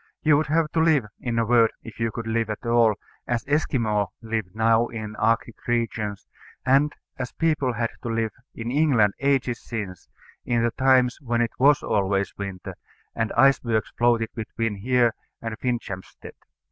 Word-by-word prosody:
You 155 Hz, -1 st, +5 dB
would 150 Hz, +1 st, +1 dB
have 155 Hz, +1 st, +1 dB
to 165 Hz, -, 0 dB
live 160 Hz, -7 st, +4 dB
in 120 Hz, -2 st, -2 dB
a 115 Hz, -, +2 dB
word, 115 Hz, -1 st, +5 dB
if 115 Hz, -, -11 dB
you 115 Hz, 0 st, +1 dB
could 115 Hz, +1 st, -6 dB
live 115 Hz, 0 st, -1 dB
at 105 Hz, +3 st, -5 dB
all, 115 Hz, -2 st, +4 dB, 0.3 s
as 120 Hz, -1 st, -1 dB
Esquimaux 115 Hz, -8 st, +1 dB, 0.2 s
live 110 Hz, -2 st, -2 dB
now 115 Hz, +1 st, +3 dB
in 110 Hz, -2 st, -6 dB
Arctic 115 Hz, 0 st, 0 dB
regions, 115 Hz, -4 st, -1 dB, 0.4 s
and 140 Hz, +3 st, +4 dB, 0.3 s
as 130 Hz, -2 st, -4 dB
people 150 Hz, -6 st, +1 dB
had 115 Hz, 0 st, -1 dB
to 120 Hz, -, -4 dB
live 115 Hz, -1 st, 0 dB, 0.2 s
in 115 Hz, +1 st, -4 dB
England 130 Hz, -9 st, +3 dB
ages 135 Hz, -4 st, +1 dB
since, 100 Hz, -6 st, -6 dB, 0.3 s
in 120 Hz, -1 st, +1 dB
the 120 Hz, -, +2 dB
times 130 Hz, 0 st, +3 dB
when 120 Hz, -3 st, -1 dB
it 115 Hz, -2 st, 0 dB
was 140 Hz, +2 st, +5 dB
always 100 Hz, -1 st, 0 dB
winter, 100 Hz, -2 st, -6 dB, 0.4 s
and 115 Hz, -1 st, -1 dB
icebergs 120 Hz, -4 st, +3 dB
floated 120 Hz, -2 st, +2 dB
between 115 Hz, -1 st, -3 dB
here 120 Hz, +2 st, +2 dB, 0.3 s
and 115 Hz, -1 st, -5 dB
Finchampstead. 115 Hz, -7 st, -5 dB
115 Hz, 165 wpm, -24 LUFS, 110-130 Hz, 0.4 s, You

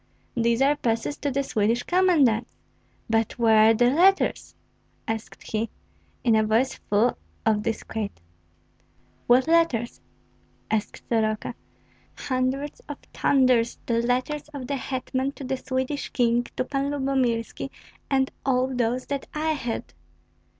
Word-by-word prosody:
"These 235 Hz, +1 st, +2 dB
are 285 Hz, +2 st, +4 dB
passes 230 Hz, +1 st, -1 dB
to 290 Hz, -, -2 dB
the 275 Hz, +1 st, 0 dB
Swedish 230 Hz, 0 st, +1 dB
commandants; 300 Hz, -11 st, +2 dB, 0.5 s
but 225 Hz, +1 st, 0 dB
where 220 Hz, -2 st, +6 dB
are -, -, +6 dB
the 245 Hz, +2 st, +4 dB
letters?" 375 Hz, +7 st, +3 dB, 0.5 s
asked 225 Hz, 0 st, -5 dB
he, 220 Hz, +1 st, -1 dB, 0.5 s
in 230 Hz, -3 st, +4 dB
a 220 Hz, -, +4 dB
voice 225 Hz, +5 st, +2 dB
full 215 Hz, +4 st, +1 dB, 0.3 s
of 215 Hz, -2 st, +3 dB
disquiet. 220 Hz, -1 st, -4 dB, 1.1 s
"What 250 Hz, +2 st, +5 dB
letters?" 325 Hz, -9 st, +2 dB, 0.7 s
asked 220 Hz, -1 st, -2 dB
Soroka. 220 Hz, 0 st, 0 dB, 0.6 s
"Hundreds 265 Hz, +2 st, -2 dB
of 290 Hz, -, -5 dB, 0.2 s
thunders! 255 Hz, -4 st, +3 dB
the 230 Hz, -1 st, +1 dB
letters 255 Hz, +5 st, -1 dB
of 265 Hz, -3 st, -5 dB
the 280 Hz, -, -2 dB
hetman 260 Hz, +1 st, -2 dB
to 280 Hz, -, -9 dB
the 265 Hz, 0 st, -2 dB
Swedish 260 Hz, +2 st, -3 dB
King, 240 Hz, -1 st, +2 dB
to -, -, +1 dB
Pan 275 Hz, +1 st, -2 dB
Lyubomirski, 265 Hz, -5 st, -1 dB, 0.4 s
and 265 Hz, -1 st, +2 dB
all 260 Hz, 0 st, +1 dB
those 245 Hz, +1 st, 0 dB
that 280 Hz, -1 st, -4 dB
I 315 Hz, +1 st, 0 dB
had." 245 Hz, -7 st, -4 dB
250 Hz, 130 wpm, -25 LUFS, 230-275 Hz, 1.1 s, where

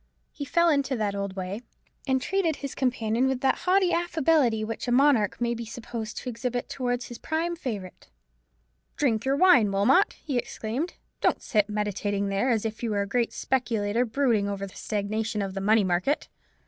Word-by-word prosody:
He 285 Hz, -, -6 dB
fell 340 Hz, +4 st, +3 dB
into 280 Hz, -3 st, +1 dB
the 210 Hz, -3 st, -1 dB
old 200 Hz, -1 st, -3 dB
way, 190 Hz, +3 st, -4 dB, 0.5 s
and 265 Hz, -1 st, +2 dB
treated 350 Hz, +1 st, 0 dB
his 280 Hz, -2 st, -6 dB
companion 245 Hz, -1 st, 0 dB
with 265 Hz, -1 st, -1 dB
that 270 Hz, -, +2 dB
haughty 375 Hz, -1 st, +4 dB
affability 315 Hz, -9 st, +2 dB
which 225 Hz, +3 st, -4 dB
a -, -, 0 dB
monarch 250 Hz, -5 st, +3 dB
may 235 Hz, -1 st, 0 dB
be 235 Hz, 0 st, -5 dB
supposed 225 Hz, -1 st, -6 dB
to -, -, -6 dB
exhibit 245 Hz, +1 st, -3 dB
towards 245 Hz, -2 st, -2 dB
his 240 Hz, -, -8 dB
prime 330 Hz, +2 st, -1 dB
favourite. 210 Hz, -, -6 dB, 0.9 s
"Drink 230 Hz, -6 st, +1 dB
your 270 Hz, +1 st, +2 dB
wine, 280 Hz, -, +5 dB
Wilmot," 255 Hz, -, +4 dB
he 270 Hz, -5 st, -2 dB
exclaimed; 245 Hz, +10 st, -4 dB, 0.3 s
"don't -, -, +1 dB
sit 210 Hz, -3 st, +1 dB
meditating 205 Hz, -1 st, -1 dB
there, 200 Hz, +6 st, +1 dB
as 225 Hz, -3 st, +1 dB
if 220 Hz, -1 st, -4 dB
you 235 Hz, -, -1 dB
were 205 Hz, -1 st, 0 dB
a -, -, -6 dB
great 235 Hz, +3 st, 0 dB
speculator 230 Hz, -3 st, 0 dB
brooding 230 Hz, -4 st, +1 dB
over 200 Hz, -1 st, -3 dB
the 190 Hz, -, -12 dB
stagnation 215 Hz, +1 st, -2 dB
of 195 Hz, -2 st, -2 dB
the 195 Hz, -, -4 dB
money 215 Hz, +2 st, +4 dB
market. 185 Hz, +10 st, 0 dB
235 Hz, 185 wpm, -26 LUFS, 210-270 Hz, 0.9 s, wine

